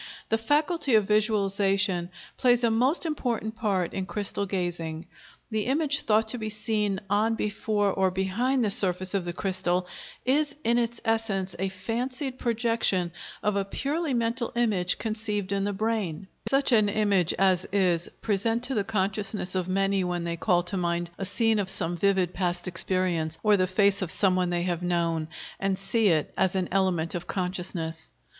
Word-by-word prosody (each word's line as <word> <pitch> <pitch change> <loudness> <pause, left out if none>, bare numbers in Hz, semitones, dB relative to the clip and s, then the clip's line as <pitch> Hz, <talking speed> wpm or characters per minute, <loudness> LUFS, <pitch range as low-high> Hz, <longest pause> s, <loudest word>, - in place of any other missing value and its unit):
The 225 - +3
faculty 295 +2 +2
of 215 -2 +4
visualization 195 -4 +1 0.3
plays 245 -2 +3
a 230 - +4
most 255 +10 +2
important 240 -8 -2
part 195 -6 -1
in 190 -1 -3
crystal 200 -1 -2
gazing. 175 -4 -3 0.5
The 215 0 -1
image 285 +1 +1
thought 220 +1 +3
to 245 - -2
be 220 -1 -3
seen 210 -2 -1
on, 215 +3 +2
before, 210 -1 0
or 190 -1 +2
behind 220 +8 0
the 205 - +1
surface 185 -3 +1
of 195 -3 0
the 175 - -2
crystal, 185 -1 -1 0.4
is 285 +3 +2
in 235 +1 +3
its 235 0 -2
essence 215 -4 0
a 195 +1 0
fancied 250 +7 -4
projection 230 -7 +1 0.3
of 210 -1 +1
a 200 - +1
purely 285 - -2
mental 235 +1 -1
image 205 -7 +1
conceived 215 -3 -2
in 200 0 0
the 205 - 0
brain; 200 -4 -2 0.2
such 275 0 +3
an 215 -3 +5
image 200 -5 +2
as 185 -1 +2
is 180 -4 +2
present 225 +3 0
to 265 - -1
the 210 -5 +1
consciousness 200 -2 -1
of 185 -2 -1
many 195 0 +1
when 175 -1 -2
they 170 0 -2
call 175 0 +2
to 185 +2 -2
mind 170 -1 -1
a 195 - -2
scene 220 +2 +2
of 195 -2 -1
some 175 -2 -1
vivid 190 -1 +1
past 175 -1 -1
experience, 175 -3 -1
or 210 -1 +5
the 185 -2 +2
face 200 +1 +3
of 180 -4 -1
someone 185 -2 +2
they 175 0 0
have 175 -1 -1
known, 170 -3 0 0.3
and 195 -1 0
see 215 +3 +1
it 160 -5 +1
as 190 0 +1
an 185 -2 0
element 180 -4 +1
of 175 0 -4
consciousness. 180 -3 -3
195 Hz, 175 wpm, -27 LUFS, 180-225 Hz, 0.5 s, an